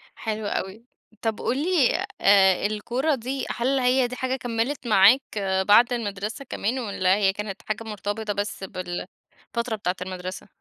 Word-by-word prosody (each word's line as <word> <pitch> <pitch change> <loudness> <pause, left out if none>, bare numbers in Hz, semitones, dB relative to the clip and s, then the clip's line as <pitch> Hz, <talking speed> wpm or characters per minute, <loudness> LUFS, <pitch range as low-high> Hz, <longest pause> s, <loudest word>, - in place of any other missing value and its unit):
حلو 220 -1 -4
أوي. 205 +3 -4 0.4
طب، 225 -2 -1
قُل 255 - 0
لي 315 -3 +2 0.2
آآ 195 -2 +5
الكورة 240 +8 0
دي 260 +2 -4
هل 265 +3 0
هي 250 0 +3
دي 250 - -7
حاجة 260 0 -1
كملت 245 +2 -2
معاك 210 +5 +6 0.5
بعد 235 +4 +6
المدرسة 210 +2 -4
كمان 245 +1 -2
والّا 190 -5 +1
هي 195 -2 +2
كانت 205 -1 -6
حاجة 215 +1 -2
مرتبطة 210 0 -3
بس 205 0 -4
بالفترة 190 +5 -6
بتاعة 185 -4 -2
المدرسة؟ 185 +1 -6
220 Hz, 145 wpm, -25 LUFS, 200-250 Hz, 0.5 s, معاك